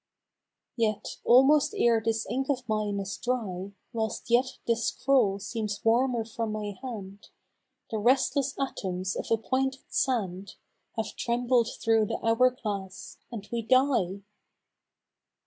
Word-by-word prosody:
Yes, 215 -3 -1
almost 270 +4 +5
ere 230 -2 +4
this 225 0 0
ink 265 +2 -2
of 260 -3 -1
mine 210 -2 -1
is 195 0 -4
dry, 200 -7 -3 0.2
Whilst 225 +1 -3
yet 255 +2 +3
this 230 -1 +1
scroll 250 -8 +2
seems 210 +1 -4
warmer 235 0 +2
from 225 0 -3
my 210 -1 -4
hand 205 -6 -8 0.6
The 220 - -1
restless 265 +4 +2
atoms 190 -8 -2
of - - -4
appointed 260 +4 0
sand 200 -7 -1 0.4
Have 220 - -3
trembled 240 0 +1
through 225 -1 +3
the - - -2
hour 230 +3 +5
glass 205 -7 -6
and 215 -4 -7
we 235 -1 -1
die 230 -6 +2
225 Hz, 130 wpm, -28 LUFS, 205-255 Hz, 0.6 s, almost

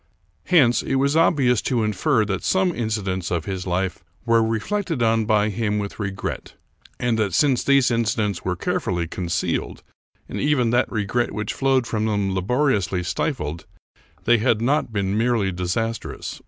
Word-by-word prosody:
Hence, 130 -9 +4
it 135 - -2
was 140 +2 +2
obvious 140 -8 +3
to 120 -4 0
infer 110 +3 +1
that 95 -3 -3
some 190 -1 +2
incidents 105 - -2
of 85 -3 -2
his 95 -1 -4
life 90 -1 -2 0.2
were 115 -1 +4
reflected 130 - -1
on 115 -1 +2
by 105 -1 +2
him 105 0 -1
with 100 +1 -5
regret; 100 -2 -5 0.4
and 120 -3 0
that, 100 -5 0
since 135 -5 +3
these 140 -3 +4
incidents 110 -3 0
were 90 -1 -1
carefully 85 0 -1
con 85 +2 -5
cealed, 85 0 -2 0.4
and - - -5
even 135 -6 +2
that 120 - +1
regret 110 +2 -1
which 105 -1 -3
flowed 135 -2 +1
from 110 -1 -1
them 100 -3 0
labori 125 +10 +1
ously 90 -1 -2
stifled, 85 - -3 0.6
they 120 0 +4
had 115 -1 +2
not 130 +1 +1
been 100 -2 -1
merely 115 -3 +1
disastrous. 95 +6 -3
110 Hz, 165 wpm, -22 LUFS, 95-125 Hz, 0.6 s, Hence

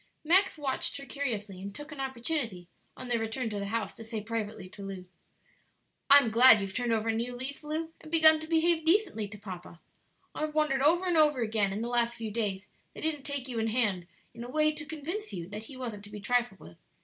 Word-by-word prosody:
Max 370 +3 +4
watched 280 -2 -2
her 275 - -8
curiously, 215 -10 -4
and 200 +1 -7
took 295 +1 -9
an 295 - -9
opportunity, 245 - -2 0.3
on 255 - -7
their 240 -1 +1
return 225 +1 -2
to 205 - -3
the 200 - -3
house, 225 +1 -2
to 225 - -10
say 225 0 -4
privately 215 -3 -4
to 195 +1 -9
her, 185 -2 -7 1.0
"I'm 280 -5 +8
glad 230 -1 +8
you've 195 -1 -4
turned 245 -2 0
over 225 0 +1
a - - +2
new 235 +2 -2
leaf, 265 +4 -5
Lu, 320 +2 -3
and 310 - -12
begun 315 -1 +7
to 315 - -7
behave 325 0 +2
decently 335 - +2
to 205 +1 -10
papa; 185 -4 -9 0.5
I've 305 0 -3
wondered 300 -3 +2
over 340 +6 +4
and 350 -2 +2
over 300 -4 +5
again 215 -3 +1
in 210 +3 -3
the - - -2
last 235 -1 +1
few 225 -2 -5
days 205 -3 -2 0.3
that - - -8
he 320 - +2
didn't 290 -2 -8
take 280 -2 -3
you 240 -3 -3
in 225 - 0
hand 210 -7 0 0.3
in 235 - -8
a 240 - -7
way 305 +2 +3
to 305 0 -6
convince 330 +7 -5
you 170 -2 -5
that 210 +2 -7
he 265 +2 -10
wasn't 230 -5 -6
to - - -11
be 210 0 -8
trifled 240 -2 0
with. 85 - -13
245 Hz, 230 wpm, -30 LUFS, 210-300 Hz, 1.0 s, I'm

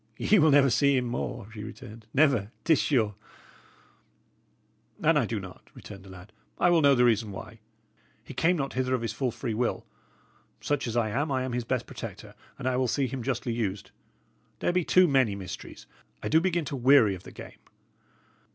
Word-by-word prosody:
"Ye 210 - +3
will 155 0 +5
never 140 -2 +5
see 140 +2 +3
him 125 - 0
more," 120 -1 -4
she 105 -2 -7
returned 110 0 -11
"never. 135 -8 +3
It - - 0
is 155 - +5
sure." 115 -8 +1 1.9
"An - - +4
I - - +2
do - - -3
not," - - -12
returned 100 -2 -11
the 95 - -14
lad, 95 +3 -13 0.2
"I 175 - +3
will 170 -2 +4
know 140 -2 +5
the 125 -1 +4
reason 110 -3 +1
why. 105 +4 -9 0.6
He - - -10
came 175 +6 +2
not 135 -2 -3
hither 130 0 0
of 120 - -4
his 115 -2 -3
full 130 +2 -1
free 120 0 -4
will; 120 +2 -2 0.7
such 145 -3 -1
as 115 +1 -2
I 115 -2 +1
am, 145 +7 -1
I 130 -1 0
am 130 -1 -4
his 120 -1 -2
best 125 0 -1
protector, 110 -4 -9 0.2
and 130 - -4
I 130 -1 +1
will 130 0 +1
see 135 +4 0
him 130 0 -4
justly 120 -1 -2
used. 105 -4 -3 0.7
There - - 0
be 180 -1 +2
too 185 +2 +5
many 130 -8 +2
mysteries; 95 -3 -9 0.4
I - - -2
do 160 +1 +4
begin 175 -3 0
to 140 - -4
weary 125 -5 +5
of 90 - -8
the - - -12
game!" - - -12
125 Hz, 205 wpm, -27 LUFS, 110-140 Hz, 1.9 s, will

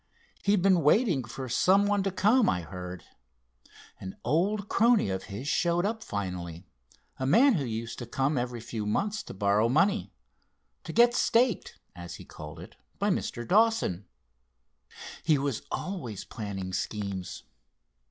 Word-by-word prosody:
He'd 200 -2 +2
been 190 -3 +4
waiting 160 - +3
for 130 +3 -7
some 190 - +3
one 205 -1 +2
to 195 - 0
come, 215 +6 +3
I 90 -2 0
heard. 90 +1 -8 1.0
An 95 0 -8
old 195 - +1
crony 230 - +3
of 95 0 -4
his 105 +8 -7
showed 175 +3 +1
up 220 +1 -2
finally, 90 -3 -5 0.5
a 130 - -2
man 255 - +6
who 150 -9 0
used 115 0 -5
to 120 - -6
come 135 +5 0
every 120 -2 -2
few 110 -2 -5
months 210 - -1
to - - -10
borrow 100 +3 +2
money, 195 - +2 0.7
'to - - -5
get 240 +1 +5
staked,' 240 -3 +1 0.2
as 85 -1 -8
he - - -11
called 75 -1 -10
it; - - -11 0.2
by - - +1
Mr. 120 -1 -3
Dawson. 215 - +2 1.1
He 155 -3 +3
was 140 -4 -2
always 135 - -5
planning 100 -5 -6
schemes. 100 -1 -4
130 Hz, 150 wpm, -28 LUFS, -, 1.1 s, man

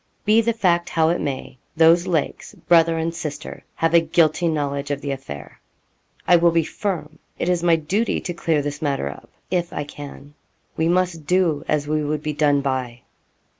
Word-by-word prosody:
Be 215 +2 +5
the 230 +1 +1
fact 175 -5 +1
how 160 -1 +2
it 170 - 0
may, 130 -2 -5 0.2
those 165 +2 +5
Lakes, 165 -4 -2
brother 165 -1 +3
and 165 +1 -1
sister, 150 -2 -6
have 165 0 0
a 170 - +8
guilty 165 +1 +2
knowledge 140 -3 -2
of 145 -1 -1
the 140 0 -4
affair. 70 - -8 0.7
'I 175 - +7
will 170 0 +4
be 165 -1 +2
firm 160 -4 -4 0.2
it - - -2
is 180 -1 +1
my 170 -1 +4
duty 190 +9 0
to 175 - -5
clear 160 -3 0
this 145 +2 -5
matter 140 - -1
up, 70 - -11 0.2
if 175 -2 0
I - - -3
can 145 0 -10 0.4
we 160 - +1
must 175 -4 0
do 175 -5 +2
as 150 -1 0
we 155 0 0
would 150 0 -2
be 150 - -2
done 145 -1 +2
by.' 130 -3 -3
160 Hz, 190 wpm, -22 LUFS, 145-170 Hz, 0.7 s, a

